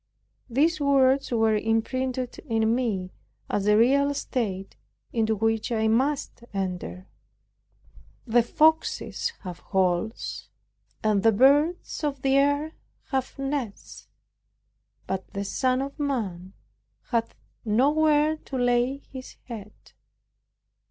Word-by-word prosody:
These 310 +7 +2
words 275 -1 +3
were 225 -2 +2
imprinted 250 +4 -1
in 225 -1 +2
me, 210 -7 -1 0.4
as 205 0 0
a 210 0 +5
real 280 +5 +3
state 200 -9 -3 0.4
into 220 -1 +1
which 225 +2 0
I 220 -1 +1
must 265 +2 0
enter, 180 - -4
(Matt. 95 +6 -31
8:20) 225 - -9
"The 240 - +7
foxes 320 +8 +2
have 180 -3 -7
holes, 190 +3 -1 0.5
and 210 -2 +2
the 225 +2 +5
birds 290 - +3
of 280 -3 -2
the 270 0 +3
air 285 +2 +2 0.4
have 265 -2 -2
nests, 275 -6 -5 1.0
but 190 0 -4
the 200 - -2
Son 255 +5 0
of 280 +2 -8
Man 200 -10 -3 0.6
hath 230 -2 0 0.3
not 250 +7 +2
where 310 0 +3
to 270 - -7
lay 245 +2 +1
his 260 -1 -9
head." 215 -4 -8
240 Hz, 120 wpm, -26 LUFS, 210-275 Hz, 1.0 s, The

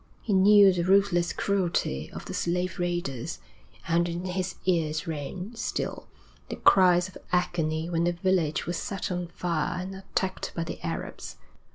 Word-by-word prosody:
He 215 - -1
knew 200 0 +7
the 175 - 0
ruthless 185 -2 +3
cruelty 180 - -1
of - - -8
the - - -6
slave 180 +2 -1
raiders, 175 -5 -2 0.5
and 170 +1 +2
in 170 +2 -4
his 185 0 -2
ears 160 -3 +1
rang, 165 +5 -5
still, 230 - -3 0.4
the - - -3
cries 180 -1 +5
of 185 - -12
agony 165 -3 0
when 170 0 0
a - - +3
village 175 -3 0
was 175 0 -2
set 200 -4 -4
on 180 -1 -2
fire 170 0 -2
and 185 +1 -5
attacked 190 0 -3
by 165 - -1
the 165 - -7
Arabs. 165 -1 -5
175 Hz, 160 wpm, -27 LUFS, 170-185 Hz, 0.5 s, knew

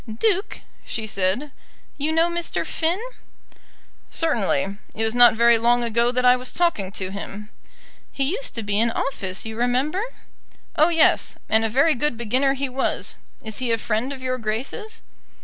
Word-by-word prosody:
"Duke," 400 - 0 0.2
she 220 - -4
said, 200 +8 0 0.4
"you 295 +2 -1
know 325 +1 +3
Mr. 345 0 -2
Finn?" 335 +4 0 1.1
"Certainly. 200 - -1 0.2
It 225 - -1
was 220 0 +1
not 245 -1 +7
very 235 0 +5
long 240 +1 +3
ago 235 +1 +1
that 250 0 0
I 250 0 +7
was 250 0 -3
talking 320 - 0
to 190 -2 -3
him." 200 +1 -8 0.6
"He 275 - -2
used - - -3
to 230 - -3
be 205 0 0
in 235 +1 +3
office, 195 -6 -3
you 220 0 -5
remember." 255 - 0 0.7
"Oh 310 +2 +5
yes; 330 -2 +3
and 220 0 +3
a 225 - +1
very 275 +8 +3
good 280 -1 -1
beginner 255 +4 +1
he 275 +1 -2
was. 260 +1 -2 0.3
Is 220 -2 -4
he 250 -2 -1
a 230 - +2
friend 225 +4 -1
of 265 -2 -7
Your 255 0 -2
Grace's?" 265 - -4
245 Hz, 170 wpm, -23 LUFS, 220-295 Hz, 1.1 s, not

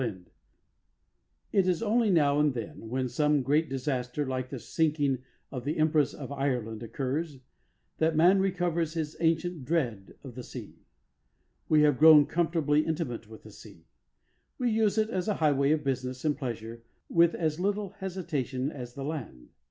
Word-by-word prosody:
XXV - - +1
THE 115 -4 -2
SEA - - -29 1.2
It 195 -3 +3
is 180 +3 +1
only 225 0 +2
now 145 -5 +3
and 150 -3 +2
then, 115 -1 -7
when 130 +1 -1
some 150 +3 +1
great 150 +5 +2
disaster 130 0 -2
like 130 -1 -3
the 135 - -5
sinking 145 -1 0 0.3
of 125 -2 -5
the 145 +4 -2
Empress 155 -2 +2
of - - -8
Ireland 125 -6 -2
occurs, 140 +5 -3 0.6
that 160 0 +2
man 180 +5 +5
recovers 175 -4 0
his 155 -2 -3
ancient 165 -1 0
dread 125 -10 -2
of 130 -3 -9
the 125 - -7
sea. - - -10 0.9
We 150 -1 +5
have 145 -4 +3
grown 155 -2 +8
comfortably 160 -3 +1
intimate 140 -10 -3
with 110 - -12
the 105 - -12
sea. 100 -5 -15 0.7
We 245 -2 0
use 220 -1 +2
it 220 +1 +1
as 185 -2 -2
a 210 - +1
highway 140 -3 +2
of 155 0 +2
business 130 0 -3
and 150 -2 +2
pleasure 115 -4 -6 0.3
with 170 0 +4
as 155 -1 -1
little 200 +1 -1
hesitation 150 -8 -3
as 125 -4 -8
the 135 - -5
land. 120 - -6
150 Hz, 170 wpm, -29 LUFS, 130-165 Hz, 1.2 s, grown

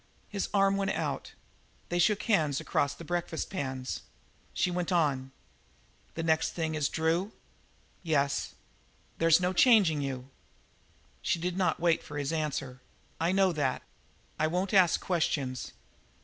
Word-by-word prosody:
His 200 -2 -3
arm 195 -1 +3
went 195 -1 0
out; - - -3 0.6
they 175 - 0
shook 210 +4 +3
hands 155 - +2
across 140 - 0
their 165 - -10
breakfast 175 -1 -3
pans. 130 -7 -4 0.5
She 180 - 0
went 175 +1 -2
on: 140 -6 +1 0.8
"The 165 - -3
next 160 -1 +1
thing 160 -2 -2
is 150 -2 0
Drew?" 165 +6 0 0.7
"Yes." 140 -4 0 0.6
"There's 165 0 +5
no 180 0 0
changing 190 - +5
you." 135 -1 -5 0.9
She - - +1
did 175 +1 -2
not 185 -1 +1
wait 170 -1 +2
for 150 - -8
his 145 +2 -2
answer. 140 -5 -3 0.4
"I 165 +2 +2
know 190 -1 +3
that. 145 -6 -1 0.6
I 155 - +3
won't 180 +5 -1
ask 185 -4 +5
questions. 145 -7 -1
165 Hz, 140 wpm, -30 LUFS, 145-180 Hz, 0.9 s, There's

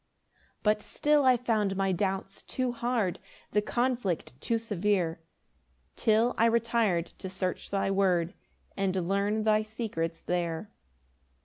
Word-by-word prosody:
6 - - -36 0.2
But 210 0 +3
still 295 +5 +2
I 255 -1 +6
found 215 -5 0
my 195 0 +1
doubts 195 +1 -2
too 255 -1 -2
hard, 235 -6 -1 0.3
The 210 - +3
conflict 240 - -1
too 230 - +1
severe, 200 -6 0 0.8
Till 225 +2 +3
I 230 - +6
retir'd 230 -7 +1
to 190 - -5
search 185 -1 -3
thy 195 0 0
word, 185 -2 +2 0.4
And 190 -3 0
learn 200 +3 +1
thy 215 0 +4
secrets 215 -7 -3
there. 175 +2 -2
205 Hz, 130 wpm, -29 LUFS, 185-230 Hz, 0.8 s, I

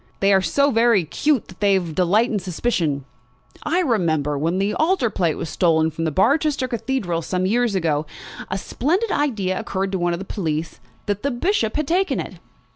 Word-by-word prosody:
They 195 0 +4
are 190 - +4
so 280 +8 +2
very 230 -6 +3
'cute 280 - 0
that 185 - -14
they 200 -2 +4
delight 185 +6 +1
in 210 - 0
suspicions. 170 - -1 0.6
I 345 +4 +1
remember, 165 - +1
when 165 +5 0
the 200 +2 0
altar 315 - +1
plate 170 -6 0
was - - -5
stolen 160 -1 +2
from 165 +2 -3
Barchester 275 - +2
Cathedral 225 -8 -2
some 180 +3 -2
years 230 +1 +1
ago, 155 -4 0 0.4
a 190 - -2
splendid 360 - -1
idea 205 -10 0
occurred 190 0 -3
to 190 - -1
one 175 0 +1
of - - -2
the 190 - -7
police, 165 -5 -3 0.3
that 205 -1 -2
the 280 - 0
Bishop 240 - 0
had 305 -2 -1
taken 375 +4 +1
it!" - - -6
195 Hz, 185 wpm, -21 LUFS, 170-250 Hz, 0.6 s, They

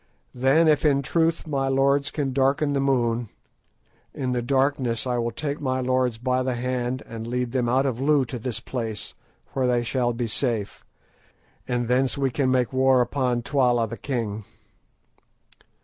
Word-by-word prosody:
Then, 135 +6 +3
if 155 -1 +3
in 140 -2 +3
truth 165 +4 +1
my 140 -3 -1
lords 140 +1 +2
can 140 -4 -2
darken 140 +2 +2
the 140 - +1
moon, 120 -4 0 0.9
in 130 -2 -2
the 125 -1 0
darkness 130 -3 0
I 125 -1 0
will 120 0 0
take 145 +5 -4
my 130 -2 -1
lords 130 -2 0
by 125 +2 0
the 130 -1 -1
hand 125 +1 -2
and 115 0 -7
lead 125 0 -2
them 125 -2 0
out 130 +3 +2
of 130 -2 -2
Loo 145 -1 +3
to 125 +1 -5
this 120 0 -4
place, 115 -4 -5 0.4
where 130 -2 +1
they 120 -1 +2
shall 120 0 0
be 120 0 -3
safe, 115 -3 -1 0.8
and 120 -1 -1
thence 130 +3 +2
we 135 -2 0
can 130 0 0
make 130 -1 +1
war 130 0 +4
upon 125 -1 0
Twala 125 -4 +2
the 115 - -6
king." 115 -5 -3
130 Hz, 170 wpm, -24 LUFS, 120-135 Hz, 0.9 s, war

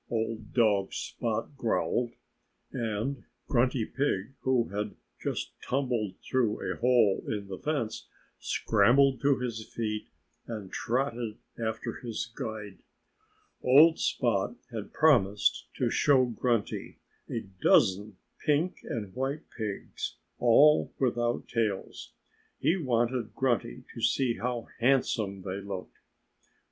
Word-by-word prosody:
old 110 -1 -2
dog 105 -5 +3
Spot - - -3
growled. 120 -1 0 0.6
And 115 +3 -2 0.2
Grunty 125 -2 +2
Pig, 130 -4 -1
who 130 -3 +1
had 105 +1 -3 0.3
just - - -3
tumbled 125 -7 -1
through 120 -5 +1
a - - -10
hole 120 -5 +3
in 105 -2 -2
the 95 -1 -6
fence, 140 -8 -2 0.3
scrambled 135 0 +3
to 140 -1 +4
his 115 -3 -3
feet 105 -2 -3 0.4
and 105 -5 -6
trotted 120 -3 -1 0.3
after 110 +1 -3
his 115 -4 -3
guide. 105 -3 -6 0.8
Old 155 +6 +7
Spot 115 -2 +1 0.2
had 110 -3 -6
promised 115 -11 +3
to - - 0
show 135 -3 +4
Grunty 120 -2 -1 0.3
a 115 - -2 0.2
dozen 100 0 +4 0.3
pink 155 +4 +2
and 105 -5 -5
white 135 +4 -3
pigs, 105 -4 -4 0.2
all 145 +6 +5
without 120 -2 0
tails. 110 -5 -2 0.4
He 170 - +2
wanted 120 - 0
Grunty 120 - 0
to - - -7
see 125 -4 +2
how 120 -1 -2
handsome 115 -6 +1
they 95 +1 -4
looked. 95 -2 -7
115 Hz, 115 wpm, -29 LUFS, 105-130 Hz, 0.8 s, Old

